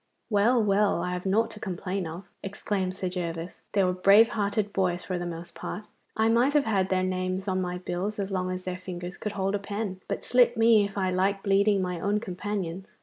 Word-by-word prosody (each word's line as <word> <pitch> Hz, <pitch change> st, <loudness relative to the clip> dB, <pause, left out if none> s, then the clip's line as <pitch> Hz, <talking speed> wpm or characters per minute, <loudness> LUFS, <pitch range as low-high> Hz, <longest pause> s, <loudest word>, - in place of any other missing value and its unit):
'Well, 220 Hz, +3 st, +4 dB
well, 200 Hz, -3 st, +2 dB
I 180 Hz, -, -2 dB
have 180 Hz, +1 st, -4 dB
nought 225 Hz, +4 st, +2 dB
to 210 Hz, -, -10 dB
complain 190 Hz, -1 st, -3 dB
of!' 170 Hz, +4 st, -7 dB, 0.2 s
exclaimed 195 Hz, -1 st, -2 dB
Sir 190 Hz, -1 st, -3 dB
Gervas. 170 Hz, -1 st, -4 dB
'They 200 Hz, -, +3 dB
were 180 Hz, 0 st, +2 dB
brave 200 Hz, +5 st, +6 dB
hearted 205 Hz, -1 st, -1 dB
boys 180 Hz, -2 st, 0 dB
for 185 Hz, -2 st, -3 dB
the 175 Hz, -, -3 dB
most 170 Hz, 0 st, -7 dB
part. 210 Hz, -, -6 dB, 0.3 s
I 220 Hz, 0 st, +3 dB
might 240 Hz, +5 st, +3 dB
have 295 Hz, -2 st, +3 dB
had 195 Hz, -3 st, +1 dB
their 185 Hz, -1 st, +1 dB
names 185 Hz, +1 st, -2 dB
on 185 Hz, -1 st, 0 dB
my 180 Hz, 0 st, -2 dB
bills 185 Hz, +3 st, -3 dB
as 200 Hz, -1 st, -3 dB
long 185 Hz, -1 st, -1 dB
as 185 Hz, 0 st, -4 dB
their 185 Hz, 0 st, -4 dB
fingers 180 Hz, 0 st, -6 dB
could 210 Hz, -1 st, -5 dB
hold 195 Hz, -1 st, -1 dB
a 205 Hz, -, 0 dB
pen, 200 Hz, -2 st, -4 dB
but -, -, -3 dB
slit 245 Hz, -1 st, +4 dB
me 225 Hz, -2 st, +5 dB
if 200 Hz, 0 st, -7 dB
I 190 Hz, -1 st, +1 dB
like 195 Hz, +2 st, +1 dB
bleeding 200 Hz, 0 st, +3 dB
my 180 Hz, -1 st, -3 dB
own 205 Hz, +4 st, +1 dB
companions. 190 Hz, -2 st, -4 dB
195 Hz, 220 wpm, -27 LUFS, 185-205 Hz, 0.3 s, brave